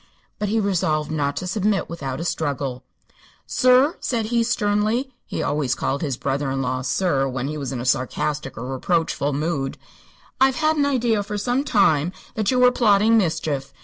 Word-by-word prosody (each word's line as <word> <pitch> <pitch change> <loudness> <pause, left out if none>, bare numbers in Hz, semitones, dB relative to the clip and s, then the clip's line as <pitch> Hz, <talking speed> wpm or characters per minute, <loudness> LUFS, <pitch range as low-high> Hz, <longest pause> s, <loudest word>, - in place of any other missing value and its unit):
But 210 - -1
he 225 +2 +1
resolved 160 -7 0
not 145 -2 -1
to - - -3
submit 200 +1 0
without 140 -5 -5
a - - -3
struggle. 140 -6 -2 0.6
"Sir," 255 +4 +4
said 230 -4 -1
he, 235 +1 +1
sternly 220 +4 0
he - - -3
always 145 -5 0
called 140 - -2
his 140 -6 -2
brother 140 0 -1
in 135 0 -2
law 130 0 -1
"sir" 135 0 +1
when 130 0 -3
he 150 - -4
was 140 -3 -4
in 130 - -4
a 120 - -5
sarcastic 135 +2 -1
or 115 - -5
reproachful 160 0 0
mood 145 -2 -2 0.6
"I've 265 0 +4
had 310 +3 +2
an 285 -2 +2
idea 240 -6 +1
for 205 +1 -4
some 245 +6 0
time 180 - +2 0.2
that 215 -2 -1
you 255 - +2
were 250 0 +6
plotting 220 -2 +4
mischief. 155 -8 0
170 Hz, 180 wpm, -22 LUFS, 140-225 Hz, 0.6 s, were